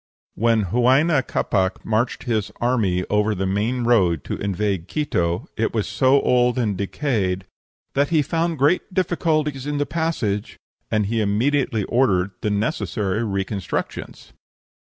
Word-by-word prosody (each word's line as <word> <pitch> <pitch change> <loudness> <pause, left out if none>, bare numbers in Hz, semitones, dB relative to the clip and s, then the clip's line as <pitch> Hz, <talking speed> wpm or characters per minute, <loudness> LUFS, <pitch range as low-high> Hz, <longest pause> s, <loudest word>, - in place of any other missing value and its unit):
When 115 0 +2
Huayna 130 - +3
Capac 95 -1 -1
marched 110 +3 0
his 110 -5 -1
army 105 -8 +1
over 105 +1 +2
the 95 0 -2
main 110 +6 0
road 95 - +3
to - - -4
invade 100 -2 -2
Quito, 90 - -1
it 110 +1 -1
was 110 - +1
so 135 +1 +3
old 125 0 +3
and 110 -5 0
decayed 100 -3 -1 0.5
"that 140 +1 +1
he 160 -3 +3
found 165 +2 -1
great 145 +9 +2
difficulties 155 -6 0
in 145 0 -1
the 145 - +1
passage," 150 -13 -2 0.3
and 105 -1 +1
he 115 +2 0
immediately 115 +2 +1
ordered 100 -6 +2
the 105 - 0
necessary 105 0 -1
reconstructions. 100 -2 -4
110 Hz, 135 wpm, -22 LUFS, 100-135 Hz, 0.5 s, Huayna